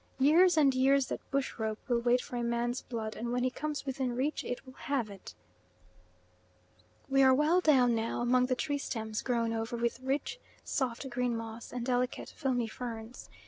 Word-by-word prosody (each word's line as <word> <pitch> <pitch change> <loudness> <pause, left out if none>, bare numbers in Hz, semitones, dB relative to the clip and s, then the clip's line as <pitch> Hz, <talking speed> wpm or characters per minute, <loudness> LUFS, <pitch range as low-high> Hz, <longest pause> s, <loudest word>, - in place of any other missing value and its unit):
Years 325 +6 +5
and 280 -3 +5
years 265 +1 +3
that - - -3
bush 275 -3 -2
rope 220 -1 -1
will 240 -2 +2
wait 245 +1 +3
for 250 - -8
a 240 - -1
man's 235 +1 -1
blood, 220 -3 -5
and 235 +1 -4
when 250 0 0
he 255 - +1
comes 300 +1 -4
within 265 -2 -2
reach 275 +5 -1
it 245 - -5
will 260 - -12
have 255 -6 -2
it. 195 -1 -11 1.7
We 270 0 +3
are 260 -1 +7
well 310 +6 +3
down 260 -7 +5
now 225 +1 -1
among 250 +1 +3
the 255 - +1
tree 285 +3 -1
stems 220 -4 -3
grown 235 -2 0
over 225 +1 -3
with 235 +1 -1
rich 270 - -2 0.2
soft 260 0 -2
green 245 -1 0
moss 225 0 -7
and 245 -1 -4
delicate 250 0 -1
filmy 255 -5 0
ferns. 230 0 -7
250 Hz, 185 wpm, -31 LUFS, 235-270 Hz, 1.7 s, are